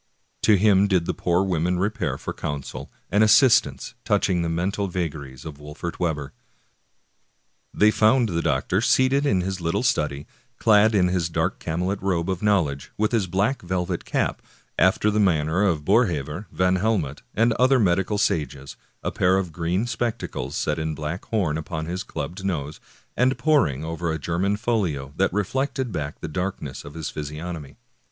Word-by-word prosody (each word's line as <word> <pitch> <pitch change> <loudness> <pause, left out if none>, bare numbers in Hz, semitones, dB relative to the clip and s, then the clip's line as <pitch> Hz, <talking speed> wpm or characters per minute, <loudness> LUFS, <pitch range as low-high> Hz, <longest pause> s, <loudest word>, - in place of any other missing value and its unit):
^ - - -45
To 105 - +5
him 100 0 +4
did 90 -4 +2
the - - -1
poor 90 +2 +1
women 90 -1 0
repair 95 - -1
for - - -5
counsel 70 -2 -5 0.2
and 105 +2 +4
assist 120 +3 +6
ance - - -9
touching 90 -3 +1
the 85 - -1
mental 95 +4 -1
vagaries 75 -7 -5
of 75 -3 -8
Wolfert 75 +4 -7
Webber. 75 -5 -2 1.4
They 105 +1 +4
found 110 +3 +4
the 85 -2 -1
doctor 70 +9 0
seated 130 +4 +3
in 95 -8 +2
his 95 0 -3
little 85 0 0
study, 75 -1 0 0.3
clad 110 0 +4
in 90 -2 +3
his 90 -2 0
dark 85 +3 -1
camlet 90 +4 -2
^ - - -20
robe 90 -1 0
of 95 - -3
knowledge, 85 -10 +1
with 105 0 +1
his 110 -6 +1
black 100 +9 0
velvet 90 -1 -2
cap, - - -1 0.4
after 95 +3 +3
the 105 - +1
manner 80 -3 +2
of 85 -8 +1
Boerhaave/ 90 - +1
Van 90 0 +2
Helmont,* 90 -9 -1
and 115 +1 +3
other 130 +3 +4
medical 95 -1 +1
sages, 70 -7 -1 0.3
a - - -1
pair 95 +1 +2
of 95 -3 -2
green 85 +6 -1
spectacles 115 - -3
set 75 0 -1
in 80 0 -2
black 75 +5 -5
horn 90 -9 0
upon 80 0 -4
his 90 +3 -3
clubbed 95 +3 -6
nose, 75 -6 -3 0.4
and 130 +1 +2
poring 85 - +2
over 80 +1 -3
a 80 - -1
German 90 +6 -1
folio 90 - -1
that - - +2
reflected 130 +6 -1
back 75 -4 -5
the - - -4
darkness 90 +5 -4
of 70 +2 -11
his 80 -2 -4
physiognomy. 75 +1 -6
90 Hz, 175 wpm, -24 LUFS, 80-105 Hz, 1.4 s, assist